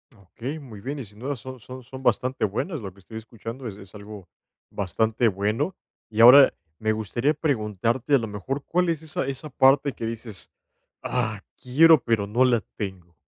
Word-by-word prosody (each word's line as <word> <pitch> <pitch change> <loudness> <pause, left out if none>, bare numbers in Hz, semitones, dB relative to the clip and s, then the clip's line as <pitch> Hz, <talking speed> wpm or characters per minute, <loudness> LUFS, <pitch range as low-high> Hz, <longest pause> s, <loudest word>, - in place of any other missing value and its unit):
Okey, 115 - -7
muy 110 -8 -11
bien, 140 +5 -4
y 125 - -6
sin 105 +1 -17
duda 140 +4 -3
son 130 +1 -9
son 130 +2 -10
son 130 +1 -10
bastante 130 0 0
buenas, 145 - -3
lo 95 - -6
que 100 - -20
estoy 110 +4 -10
escuchando 115 +2 -8
es 100 -2 -7
es 95 -1 -14
algo, 105 -2 -10 0.4
bastante 110 +4 0
bueno, 110 - -1 0.3
y 110 +1 0
ahora 130 +3 +9 0.3
me 110 0 +1
gustaría 120 +7 0
preguntarte, 120 - 0
a - - +6
lo 115 -2 -3
mejor, 120 +8 -4
¿cuál 180 0 +1
es 160 -2 -1
esa 145 -3 -3
esa 135 +3 -5
parte 135 +1 +4
que 115 - -6
dices: 115 -5 -7 0.5
"¡Ah!, 110 -4 -2 0.2
quiero 150 +2 +5
pero, 115 -3 +1
no 120 +5 +2
la 120 -3 +3 0.2
tengo?". 95 -5 -6
115 Hz, 185 wpm, -25 LUFS, 105-135 Hz, 0.5 s, ahora